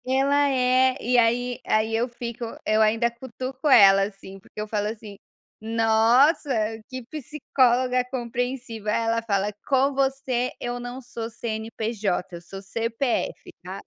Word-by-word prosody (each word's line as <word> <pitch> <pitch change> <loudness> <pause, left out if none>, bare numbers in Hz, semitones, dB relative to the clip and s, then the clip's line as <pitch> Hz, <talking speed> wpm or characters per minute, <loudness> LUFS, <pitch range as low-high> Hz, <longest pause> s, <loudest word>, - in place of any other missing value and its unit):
Ela 280 +2 +2
é, 255 0 +3
e 250 +2 0
aí 245 +1 +2
aí 220 +1 +1
eu 240 +3 0
fico 235 0 -7 0.2
eu 215 +1 +3
ainda 225 +2 +3
cutuco 260 +3 -6
ela, 195 -6 +7
assim, 195 -1 -8
porque 195 - -13
eu 210 - -3
falo 210 -1 -1
assim: 210 -2 -7 0.4
"Nossa, 225 +7 +3 0.4
que 255 -1 -6
psicóloga 255 -3 +1
compreensiva". 240 -3 -4
Aí 230 - 0
ela 230 0 +1
fala: 205 -2 -1
"Com 275 +1 +3
você 265 -2 0
eu 245 0 -4
não 245 +2 -7
sou 235 -2 -6
CNPJ, 220 -5 -3
eu - - -12
sou 195 +3 -10
CPF, 230 +5 -2
tá?". - - -7
235 Hz, 145 wpm, -24 LUFS, 220-255 Hz, 0.4 s, ela